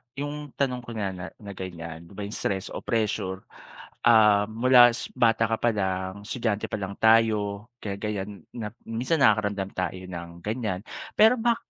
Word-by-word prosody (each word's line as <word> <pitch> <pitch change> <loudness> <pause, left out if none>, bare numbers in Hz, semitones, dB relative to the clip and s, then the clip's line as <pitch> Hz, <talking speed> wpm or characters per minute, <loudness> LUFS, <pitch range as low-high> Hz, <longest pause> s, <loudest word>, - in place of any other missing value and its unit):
yung 145 0 -5
tanong 130 -3 0
ko 120 - -9
na 100 -3 -1
na 90 -1 -7
na 100 -2 -9
ganyan, 85 -3 -7
di 100 - -16
ba 105 - -5
yung 100 - -5
stress 95 0 -2
o - - -4
pressure, 100 -4 -1 0.6
ah, 105 -3 +6
mula 120 +2 +6
s 120 - -4
bata 115 -1 +3
ka 115 - +1
palang 95 -3 -1
estudyante 110 -3 -1
pa - - -1
lang 100 0 -5
tayo 110 -2 +3 0.2
kaya 100 -2 -3
ganyan 100 -3 -4
na 110 -3 -4 0.2
minsan 125 +8 0
nakaka-ramdam 105 -5 +3
tayo 90 0 -2
ng 85 -2 -7
ganyan, 105 -4 -2 0.4
pero 220 +3 +6
ba 235 +1 +3
105 Hz, 170 wpm, -26 LUFS, 95-115 Hz, 0.6 s, ah